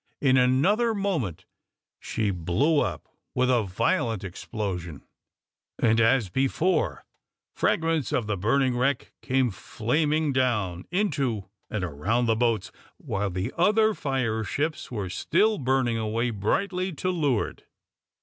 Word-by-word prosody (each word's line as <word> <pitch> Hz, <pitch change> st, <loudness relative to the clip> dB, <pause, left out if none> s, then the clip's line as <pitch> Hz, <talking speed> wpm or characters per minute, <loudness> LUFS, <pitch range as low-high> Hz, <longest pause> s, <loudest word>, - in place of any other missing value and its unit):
In 130 Hz, -2 st, +3 dB
another 180 Hz, -, +3 dB
moment 165 Hz, -, -2 dB, 0.5 s
she 105 Hz, -3 st, -1 dB
blew 95 Hz, -, +1 dB
up -, -, -2 dB, 0.3 s
with 130 Hz, 0 st, +3 dB
a 120 Hz, -2 st, +3 dB
violent 110 Hz, +2 st, 0 dB
explosion, 90 Hz, -3 st, -5 dB, 0.7 s
and 115 Hz, -1 st, +3 dB
as 115 Hz, -1 st, +3 dB
before, 135 Hz, -, 0 dB, 0.5 s
fragments 165 Hz, -3 st, +1 dB
of 120 Hz, -, 0 dB
the 105 Hz, 0 st, -1 dB
burning 125 Hz, +7 st, +1 dB
wreck 125 Hz, +1 st, 0 dB
came 130 Hz, -3 st, +1 dB
flaming 150 Hz, -, 0 dB
down 105 Hz, -9 st, 0 dB
into 140 Hz, -, -1 dB, 0.2 s
and 110 Hz, -3 st, -2 dB
around 90 Hz, +10 st, 0 dB
the 115 Hz, -1 st, +2 dB
boats, 115 Hz, -1 st, 0 dB, 0.3 s
while 100 Hz, +1 st, -2 dB
the 90 Hz, +1 st, -3 dB
other 215 Hz, +5 st, +4 dB
fire 130 Hz, -, -1 dB
ships 155 Hz, +8 st, -2 dB
were 105 Hz, -6 st, -3 dB
still 200 Hz, -, +1 dB
burning 130 Hz, -3 st, +1 dB
away 115 Hz, +2 st, -1 dB
brightly 185 Hz, -, -1 dB
to 185 Hz, +5 st, -1 dB
leeward. 145 Hz, -10 st, -1 dB
125 Hz, 125 wpm, -26 LUFS, 105-150 Hz, 0.7 s, other